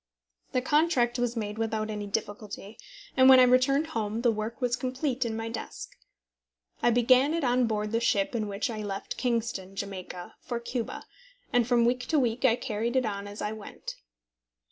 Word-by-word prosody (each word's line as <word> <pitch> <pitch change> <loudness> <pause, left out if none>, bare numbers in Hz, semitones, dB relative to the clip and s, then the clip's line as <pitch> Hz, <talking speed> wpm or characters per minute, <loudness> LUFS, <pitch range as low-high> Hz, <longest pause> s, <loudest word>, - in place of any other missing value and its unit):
The 255 - +1
contract 295 -5 +2
was 245 0 0
made 210 0 -3
without 220 -1 -1
any 210 -1 -4
difficulty, 205 0 -5 0.4
and 260 0 +7
when 260 -1 +10
I - - +8
returned 255 +4 +4
home 220 0 -2
the 240 - +5
work 215 +1 -4
was 245 -2 +1
complete 255 +1 -2
in 225 -1 -2
my 225 0 -3
desk. 225 0 -6 0.9
I - - +4
began 255 +5 +4
it 335 - -1
on 250 -1 +3
board 210 -1 -1
the 230 - +2
ship 205 -3 +1
in 220 -3 -1
which 205 +6 -2
I 215 -1 -4
left 200 -2 -4
Kingston, 230 -6 -2
Jamaica, 185 -3 -6
for 240 -1 -4
Cuba, 235 0 -4 0.5
and 245 -2 +3
from 240 -2 +4
week 250 +1 0
to 315 - +2
week 245 -2 +1
I 230 -3 +5
carried 235 -1 -2
it 260 -1 +3
on 200 -1 -3
as 205 +1 -7
I 210 - -1
went. 215 -1 -8
235 Hz, 190 wpm, -28 LUFS, 210-250 Hz, 0.9 s, when